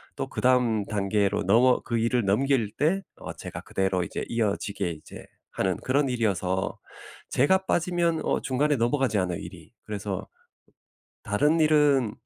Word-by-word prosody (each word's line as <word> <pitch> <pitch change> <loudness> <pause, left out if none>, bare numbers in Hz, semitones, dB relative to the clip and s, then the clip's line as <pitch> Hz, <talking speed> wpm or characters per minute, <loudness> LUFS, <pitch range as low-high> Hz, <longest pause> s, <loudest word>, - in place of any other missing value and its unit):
또 - - -3
그다음 125 -4 +2
단계로 100 -1 0
넘어 120 +6 +4
그 115 -1 -2
일을 115 0 +1
넘길 115 +2 +1
때 175 +6 +1 0.2
어 - - -7
제가 - - -8
그대로 95 -1 -1
이제 - - -5
이어지게 105 -4 -1
이제 80 -2 -10 0.3
하는 95 -2 -1
그런 140 +2 0
일이어서 95 -6 -1 0.5
제가 190 +9 +2
빠지면 170 -1 +1
어 - - 0
중간에 145 +3 +1
넘어가지 120 -2 +1
않아요 90 -2 -1
일이. - - -11
그래서 100 -2 -4 1.0
다른 150 +11 +2
일은 145 -7 +3
115 Hz, 305 characters per minute, -26 LUFS, 100-140 Hz, 1.0 s, 넘어